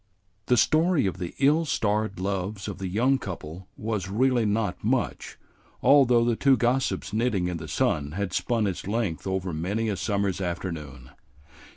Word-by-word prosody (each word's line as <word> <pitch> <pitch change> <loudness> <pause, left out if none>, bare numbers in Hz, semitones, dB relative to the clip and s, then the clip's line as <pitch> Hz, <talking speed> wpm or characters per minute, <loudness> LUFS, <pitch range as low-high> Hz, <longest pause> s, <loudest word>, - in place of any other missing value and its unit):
The 125 - +4
story 160 - +3
of 95 -1 -2
the 90 -2 -5
ill 150 +4 +3
starred 110 - -1
loves 95 +1 -3
of 100 -2 -6
the 95 - -3
young 125 +8 +2
couple 90 -1 -7
was 105 -4 -3
really 120 +2 +2
not 105 -2 -1
much, - - -1 0.5
although 125 -4 +5
the 120 -1 +2
two 135 +2 +4
gossips 120 -6 0
knitting 110 -5 +1
in 90 -1 -3
the 80 -1 -8
sun 75 0 0
had 95 0 -3
spun 115 +2 0
its 95 -2 -3
length 100 -7 -2
over 95 -2 -2
many 100 +8 -1
a 105 - -1
summer's 100 -1 -1
afternoon. 80 -8 -5
100 Hz, 165 wpm, -26 LUFS, 90-120 Hz, 0.5 s, although